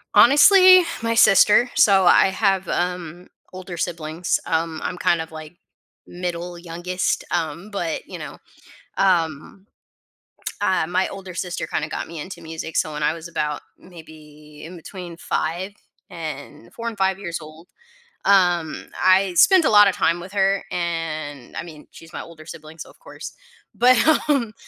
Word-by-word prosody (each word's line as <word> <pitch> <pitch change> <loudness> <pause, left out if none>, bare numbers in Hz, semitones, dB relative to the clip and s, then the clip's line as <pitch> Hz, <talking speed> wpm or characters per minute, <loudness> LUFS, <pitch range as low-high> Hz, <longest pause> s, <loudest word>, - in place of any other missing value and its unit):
Honestly, 370 +6 +7 0.2
my 230 0 0
sister. 215 +2 +5
So 195 -2 +5
I 175 - +6
have, 190 -1 0
um, 175 -1 -3 0.3
older 185 -1 -8
siblings, 165 0 -2
um, 160 0 -2
I'm 180 - -4
kind 170 -2 +1
of, 160 - -9
like, 155 +1 -11 0.5
middle 175 0 -5
youngest, 175 +2 -3
um, 165 +5 -3
but, 170 -5 -3
you - - -8
know, - - -9 0.6
um, 170 -1 0 1.0
uh, 190 -5 +1
my 180 +2 0
older 190 -2 -9
sister 175 -2 -4
kinda - - -3
got - - -5
me 165 -1 -9
into 185 +6 -8
music, 160 0 -7
so 155 - 0
when 150 - -4
I 150 - +2
was 165 0 -9
about 150 -3 -3 0.2
maybe 155 -3 -15
in 175 +3 -10
between 175 0 -9
5 175 +5 -3 0.4
and 150 -7 -9
4 235 - -6
and 225 -2 -5
5 190 -1 +1
years 170 -4 -5
old, 155 +3 -14 0.6
um, 175 -5 +2
I 185 0 +4
spent 370 - +6
a - - +4
lot 205 -1 +7
of 195 - 0
time 170 - +1
with 185 +3 -10
her 195 -1 +1
and, 155 -6 -4
I - - -4
mean, 155 -3 -13
she's 165 - -15
my - - -5
older 160 -2 -13
sibling, 155 0 -11
so - - -9
of - - -20
course, - - -10 0.4
but, 250 +1 +4 0.3
um, 245 -7 +1
175 Hz, 160 wpm, -21 LUFS, 160-195 Hz, 1.0 s, Honestly